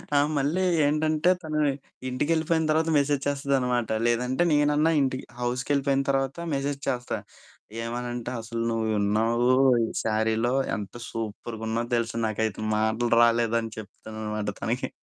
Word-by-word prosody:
ఆ! - - +6 0.2
మళ్ళీ 150 +7 +1 0.2
ఏంటంటే 155 +3 +2
తను 155 -1 -2 0.5
ఇంటికెళ్ళిపోయిన 160 +5 +1
తర్వాత 160 +1 +2
మెసేజ్ 140 -1 +1
చేస్తది 140 0 0
అనమాట. 125 -2 0 0.2
లేదంటే 125 +6 +1
నేనన్నా 150 +2 +3
ఇంటికి 130 -1 -1 0.2
హౌస్‌కెళ్ళిపోయిన 135 +3 0
తర్వాత 135 +2 0 0.2
మెసేజ్ 140 0 -2
చేస్తా. 125 -1 -1 0.7
ఏమనంటే 120 +1 -4
"అసలు 115 +1 -4
నువ్వు 115 -1 -1
ఉన్నావు 115 +4 +2 0.5
శారీలో 110 +2 +1 0.2
ఎంత 100 -3 -6 0.2
సూపర్‌గా 115 0 -6
ఉన్నావో 115 +1 -2
తెలుస. 115 0 -1
నాకైతే 110 -1 -2
మాటలు 110 +2 +1
రాలేదని" 115 -1 +2
చెప్తాననమాట 110 0 -5
తనకి. - - -1
120 Hz, 120 wpm, -26 LUFS, 115-140 Hz, 0.7 s, ఆ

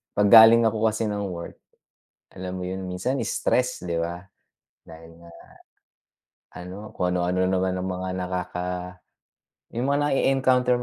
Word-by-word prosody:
'pag 105 0 +3
galing 115 +1 +9
ako 110 0 -1
kasi 110 0 -1
ng 105 -1 -3
work, 85 -1 -8 0.8
alam 95 0 -6
mo 90 - -5
yun, 95 +1 -5
minsan 125 +10 -2
stress, 125 0 -1
'di 85 -1 -2
ba, 85 +2 -5 0.6
dahil 80 0 -13
nga 85 0 -15 1.2
ano, 95 +4 -9
kung 90 - -1
ano-ano 90 +1 0
naman 95 0 0
ang 95 0 -3
mga 90 0 -4
nakaka 90 -1 -4 1.0
yung 120 +3 -3
mga 145 +1 +1
na-e-encounter 130 -2 +2
95 Hz, 140 wpm, -24 LUFS, 90-115 Hz, 1.2 s, galing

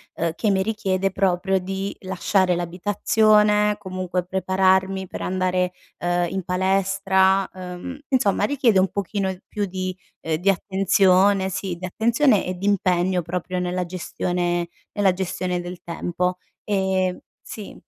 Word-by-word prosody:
uhm, 165 0 -1
che 215 - 0
mi 190 -1 +2
richiede 195 -3 -1
proprio 190 0 +1
di 195 +2 -4
lasciare 185 0 +1
l'abitazione, 210 +4 +3
comunque 185 -1 -3
prepararmi 190 0 +1
per - - -7
andare, 185 -1 0 0.3
uhm, 175 0 +1
in 190 0 -3
palestra, 190 +1 +2
uhm, 185 +8 -7
insomma 250 -7 +2
richiede 240 -6 +3
un 185 - +3
pochino 200 0 -2 0.2
più 205 -1 -2
di 185 0 -4 0.3
ehm, 160 -1 -1
di 190 +4 +1
attenzione 190 0 +3
sì, 190 -1 -3
di 180 - -6
attenzione 230 +4 +2
e 185 0 -3
di 195 - -5
impegno 185 -2 +2
proprio 180 +2 -3
nella 180 0 -1
gestione 175 0 -2 0.3
nella 200 -2 +3
gestione 185 -1 -2
del 175 0 -7
tempo. 180 +1 -2 0.3
Ehm 190 -2 0 0.2
si. 210 -3 -9
190 Hz, 135 wpm, -23 LUFS, 180-195 Hz, 0.3 s, l'abitazione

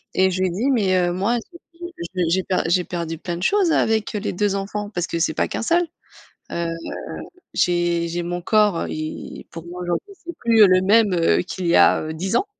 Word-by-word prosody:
Et 190 0 +3
je 185 +1 -2
lui 185 - +3
ai - - -5
dit: 235 +10 0
«Mais 195 -7 +2
heu, 175 -1 +2
moi 200 +7 0
je 345 - -12 0.6
je 180 - -1
j'ai 185 +3 +1
per 185 - -1
j'ai 180 +1 +2
perdu 170 -2 -4
plein 170 +1 -5
de 175 - -6
choses 390 - +3
avec, 220 -6 +1
heu, - - 0
les 210 - -3
2 200 +2 0
enfants 205 +1 -4
parce 175 0 -2
que 170 - -3
c'est 165 - +1
pas - - 0
qu'un - - -4
seul. 345 +6 +2 0.6
Heu, 170 0 -2 0.9
j'ai 175 -1 +1
j'ai 170 +1 -3
mon 175 +1 -3
corps, 210 -2 +3
heu, - - -3
et 155 0 -6
pour 165 0 -9
moi 180 +1 -8
aujourd'hui 180 - -3
c'est 345 0 -7
plus, 230 -2 +4
heu, 205 - +9
le 185 0 +4
même, 205 0 +4
heu, 165 -1 +3
qu'il 180 0 -5
y 170 - +3
a, - - +5
heu, 155 0 -4
10 185 +4 -2
ans». 390 - +2
185 Hz, 240 wpm, -22 LUFS, 175-210 Hz, 0.9 s, heu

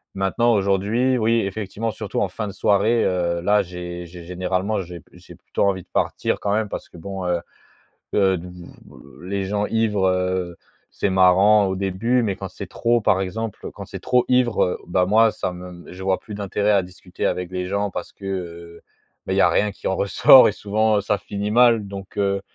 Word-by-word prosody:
Maintenant, 115 +5 +1
aujourd'hui, 105 +6 +1
oui 115 +1 +2
effectivement, 105 +3 -4
surtout 105 -2 -4
en 100 - 0
fin 105 +3 -5
de - - -5
soirée, 105 +4 +2
heu, 85 -2 0
là, 105 +3 +3
j'ai 90 -1 -7
j'ai 85 0 -11
généralement, 95 +4 -2
j'ai 85 -1 -9
p - - -30
j'ai - - -14
plutôt - - -2
envie 95 -2 0
de - - -31
partir, - - -1
quand 100 - -2
même, 110 0 0
parce - - -7
que - - -15
bon, 95 +2 -6
heu 85 -1 0 0.7
heu 95 -2 +3
d 85 - -9 0.4
ou - - -16
heu, 90 - -15
les 100 0 -2
gens 105 +1 -1
ivres, 105 -4 +1
heu, 90 -1 -1 0.4
c'est 100 - 0
marrant 95 +3 +5
au 95 - -2
début. 100 +6 0
Mais 100 -4 -1
quand 95 -1 -7
c'est 100 +1 -8
trop, 120 +5 +1
par 105 -2 +2
exemple, 110 +3 -5
quand - - -8
c'est - - -8
trop 125 -1 +2
ivre, 125 -4 +2
heu, 90 - -1
bah, 90 +1 +2
moi, 110 +2 +4
ça - - -3
me 90 +1 -9
m 85 -1 -12
je 90 +1 -9
vois 95 0 +1
plus 105 - -9
d'intérêt 100 0 -1
à 100 -2 +3
discuter 90 0 -7
avec 90 -1 -1
les 90 0 -3
gens. 100 +2 -1
Parce - - -6
que, 100 - -12
heu, 85 -3 -6 0.4
bah - - -2
il - - 0
y - - +5
a - - +5
rien 105 0 +1
qui - - -7
en 95 - 0
ressort, 100 +7 +7
et - - -1
souvent, 105 +1 +1
heu, - - +1
ça 105 +1 0
finit 100 +1 -4
mal, 115 -3 +4
donc 100 0 -9
heu, 100 -1 0
100 Hz, 220 wpm, -22 LUFS, 90-105 Hz, 0.7 s, ressort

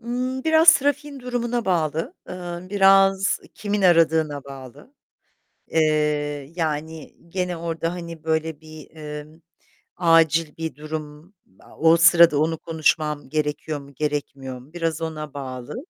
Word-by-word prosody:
Iıı, 250 +2 -3
biraz 320 +1 +7
trafiğin 285 0 -2
durumuna 245 -1 -2
bağlı. 165 -3 -1
Eee, 175 -1 -6
biraz 195 -1 +4 0.2
kimin 205 -1 -2
aradığına 160 -5 +3
bağlı. 135 - -12 0.7
Eee, 150 -2 0
yani, 160 -1 -4
gene 180 0 -2
orada 165 0 -3
hani 170 -3 -8
böyle 160 -1 -1
bir, 155 -1 -13
eee, 150 -1 -8 0.7
acil 165 -2 +3
bir 160 -4 -4
durum, 155 +3 -8 0.3
a - - -18
o 165 +1 +5
sırada 165 -2 +6
onu 160 +1 0
konuşmam 155 -3 -1
gerekiyor 150 0 -2
mu, 140 0 -14
gerekmiyor 140 -3 -4
mu 135 +6 -18
biraz 165 -2 -2
ona 155 -2 -5
bağlı. 130 -3 -7
160 Hz, 125 wpm, -23 LUFS, 150-180 Hz, 0.7 s, biraz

